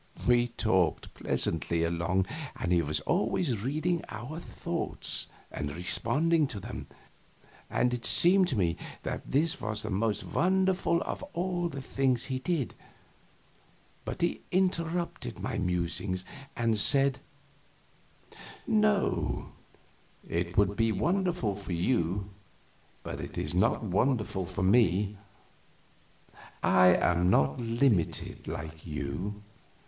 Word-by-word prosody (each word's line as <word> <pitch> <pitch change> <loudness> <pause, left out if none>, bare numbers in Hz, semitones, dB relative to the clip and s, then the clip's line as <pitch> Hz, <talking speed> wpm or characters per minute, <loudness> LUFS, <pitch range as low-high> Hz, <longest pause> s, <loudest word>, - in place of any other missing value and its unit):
We 120 0 +4
talked 95 -7 0
pleasantly 85 +1 0
along, 85 +3 +1 0.3
and 90 - -3
he 85 -1 +4
was 75 -1 0
always 125 - 0
reading 155 +6 0
our 125 +10 -6
thoughts - - -3 0.2
and 70 - -3
responding 155 - +2
to 105 - -5
them, - - -7 0.8
and 125 0 +1
it 120 -1 -3
seemed 185 +2 +5
to 135 - -1
me 85 -5 +1 0.3
that - - -4
this 160 +4 +2
was 105 0 -3
the 110 - -4
most 105 +1 0
wonderful 185 -1 +1
of - - -4
all 175 -1 -1
the 140 -3 -6
things 130 -3 +1
he 130 -1 -2
did, 145 -3 -1 1.3
but - - -5
he 170 - 0
interrupted 175 -2 0
my - - -3
musings 90 +1 -1 0.3
and 115 -2 +1
said: 135 +3 +5 1.5
"No, 210 - +1 0.8
it 85 +1 -2
would 100 0 +3
be 115 0 +2
wonderful 175 - 0
for 95 -2 -6
you, 95 +1 0 0.7
but - - -5
it - - -7
is - - -2
not - - +2
wonderful 105 -3 0
for 95 - -3
me. 100 -1 +3 1.4
I 90 -1 +6
am 90 0 +4
not 70 -6 +3
limited 115 -5 0
like 80 0 -6
you. 80 +8 -4
110 Hz, 120 wpm, -29 LUFS, -, 1.5 s, I